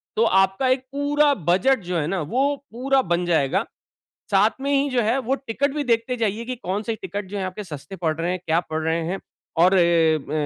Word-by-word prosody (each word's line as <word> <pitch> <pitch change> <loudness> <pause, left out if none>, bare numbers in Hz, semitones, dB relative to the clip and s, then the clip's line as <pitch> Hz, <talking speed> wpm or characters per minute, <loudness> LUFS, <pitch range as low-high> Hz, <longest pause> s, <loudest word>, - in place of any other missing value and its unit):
तो 225 - +3
आपका 195 +7 +2
एक 255 0 +2
पूरा 290 +1 +2 0.2
बजट 250 +9 +3
जो 180 0 -2
है 150 -2 -1
न, 195 - -1
वो 255 - 0 0.2
पूरा 265 +4 +1
बन 175 -4 -1
जाएगा। 170 +3 +1 0.7
साथ 200 +3 +4
में 280 +1 -1
ही 280 +1 +2
जो 255 -2 +1
है 225 +4 +1
वो 260 +1 0
टिकट 275 +2 -2
भी 295 - -1
देखते 235 0 +1
जाइए 225 0 -1
कि 255 +1 -4
कौन-से 215 +1 -3
टिकट 200 +2 -4
जो 205 - -5
है, 195 - -2
आपके 185 +3 -5
सस्ते 170 +2 -8
पड़ 165 -3 -1
रहे 170 +2 0
हैं, 185 - -2
क्या 165 +1 +2
पड़ 160 0 -2
रहे 165 +1 0
हैं? 190 +3 -3 0.4
और 180 +3 +5
एम 165 -4 +2
200 Hz, 220 wpm, -23 LUFS, 175-255 Hz, 0.7 s, और